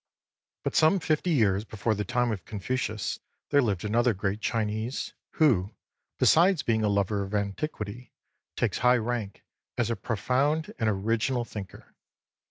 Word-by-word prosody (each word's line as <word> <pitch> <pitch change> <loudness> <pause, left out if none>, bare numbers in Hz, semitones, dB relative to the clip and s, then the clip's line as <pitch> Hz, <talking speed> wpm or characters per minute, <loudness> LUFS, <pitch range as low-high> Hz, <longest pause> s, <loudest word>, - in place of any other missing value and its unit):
But - - -2
some 160 +5 +5
fifty 160 +2 0
years 105 - +3
before 110 0 -1
the 105 0 -2
time 120 0 0
of 95 -6 -4
Confucius 110 0 -3 0.3
there 145 -1 +5
lived 105 -6 -1
another 115 +2 +2
great 100 +2 -2
Chinese, 110 +3 -2 0.2
who, 110 - +2 0.4
besides 175 -1 +4
being 110 -2 +1
a 105 - +2
lover 100 0 +1
of 100 +2 -4
antiquity, 105 +2 -4 0.4
takes - - 0
high 125 0 +5
rank 115 -4 -3 0.3
as 120 -1 +1
a - - 0
profound 130 +10 0
and 110 - +2
original 115 +5 0
thinker. 100 -5 -9
110 Hz, 145 wpm, -28 LUFS, 100-125 Hz, 0.4 s, some